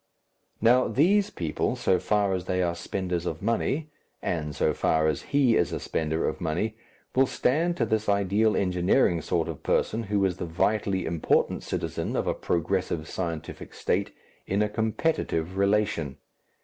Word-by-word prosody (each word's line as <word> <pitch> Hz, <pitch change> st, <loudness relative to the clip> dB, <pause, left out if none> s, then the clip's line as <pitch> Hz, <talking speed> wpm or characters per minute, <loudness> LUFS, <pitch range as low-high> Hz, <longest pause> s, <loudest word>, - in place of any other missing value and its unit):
Now, 125 Hz, +3 st, +5 dB
these 195 Hz, +8 st, +3 dB
people, 80 Hz, -, -2 dB
so 95 Hz, -1 st, +2 dB
far 100 Hz, +2 st, +1 dB
as 90 Hz, -1 st, -2 dB
they 90 Hz, 0 st, 0 dB
are 85 Hz, -1 st, 0 dB
spenders 90 Hz, 0 st, -3 dB
of 80 Hz, +2 st, -4 dB
money, 140 Hz, +7 st, 0 dB, 0.3 s
and 75 Hz, -4 st, -3 dB
so -, -, +2 dB
far 80 Hz, -1 st, +1 dB
as 75 Hz, -3 st, 0 dB
he 135 Hz, -5 st, +2 dB
is 85 Hz, -, +2 dB
a -, -, -2 dB
spender 80 Hz, 0 st, -1 dB
of -, -, -3 dB
money, 85 Hz, +7 st, -1 dB, 0.4 s
will 135 Hz, +1 st, +5 dB
stand 165 Hz, +9 st, +1 dB
to 115 Hz, -, +2 dB
this 110 Hz, -1 st, 0 dB
ideal 100 Hz, +2 st, +2 dB
engineering 90 Hz, 0 st, +2 dB
sort -, -, 0 dB
of -, -, -6 dB
person, 110 Hz, -, +1 dB
who 100 Hz, -2 st, +1 dB
is 90 Hz, -2 st, -1 dB
the -, -, -3 dB
vitally 95 Hz, +3 st, 0 dB
important 80 Hz, -1 st, +1 dB
citizen -, -, -3 dB
of -, -, 0 dB
a -, -, +1 dB
progressive 80 Hz, -1 st, -1 dB
scientific 85 Hz, -4 st, -5 dB
State, -, -, 0 dB, 0.4 s
in 100 Hz, +2 st, +1 dB
a 105 Hz, -, 0 dB
competitive 110 Hz, -, -1 dB
relation. 100 Hz, -8 st, +1 dB
95 Hz, 160 wpm, -27 LUFS, 85-110 Hz, 0.4 s, Now